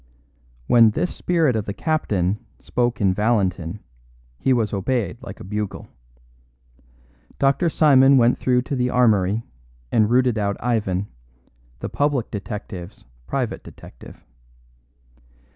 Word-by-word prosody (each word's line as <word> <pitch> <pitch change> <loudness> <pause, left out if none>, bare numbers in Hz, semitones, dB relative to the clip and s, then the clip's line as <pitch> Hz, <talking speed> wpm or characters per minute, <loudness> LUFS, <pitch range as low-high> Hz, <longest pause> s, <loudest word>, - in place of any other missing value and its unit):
When 115 - +6
this 175 +11 -2
spirit 165 -8 +1
of 110 -2 -1
the 100 - -5
captain 105 - -1 0.2
spoke 120 -2 -1
in 95 -2 +3
Valentin 95 -4 0 0.6
he 135 - +1
was 115 -5 +1
obeyed 105 +1 -1
like 125 - -9
a - - -9
bugle. 105 +1 -5 1.5
Dr. 140 +5 +2
Simon 135 -3 +5
went 120 0 +3
through 125 -1 +2
to 140 - -4
the 125 -1 0
armoury 110 -4 +2 0.5
and 110 -1 +3
routed 125 -2 +2
out 100 -1 -1
Ivan, 105 -6 -1 0.8
the - - -4
public 145 -5 -1
detective's 100 - -7 0.2
private - - -3
detective. - - -14
115 Hz, 120 wpm, -22 LUFS, 100-130 Hz, 1.5 s, When